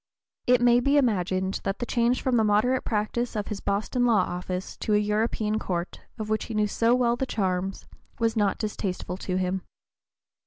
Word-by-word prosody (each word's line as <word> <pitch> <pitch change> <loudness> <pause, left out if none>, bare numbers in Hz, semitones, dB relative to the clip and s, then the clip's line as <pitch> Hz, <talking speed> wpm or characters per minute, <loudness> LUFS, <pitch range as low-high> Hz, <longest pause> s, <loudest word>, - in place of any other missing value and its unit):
It 250 0 +5
may 245 0 +5
be 280 +4 +3
imagined 190 -6 +1
that 195 0 -2
the 240 - -3
change 240 +1 +1
from 260 -2 +2
the 225 - +4
moderate 215 +5 +2
practice 225 +2 -1
of 210 -1 -3
his 210 - -4
Boston 210 +6 -1
law 230 -5 +4
office 180 +1 -4
to 215 - 0
a - - +5
European 210 +1 0
court, 175 -3 -3 0.2
of 215 -1 -4
which 215 0 -1
he 215 -2 0
so 230 +3 +2
well 245 -2 +2
knew 240 - 0
the 265 - -2
charms, 190 -3 -2 0.3
was 230 0 +1
not 205 -3 +1
distasteful 195 -4 -3
to 185 -1 -3
him. 185 0 -1
215 Hz, 190 wpm, -26 LUFS, 195-235 Hz, 0.3 s, It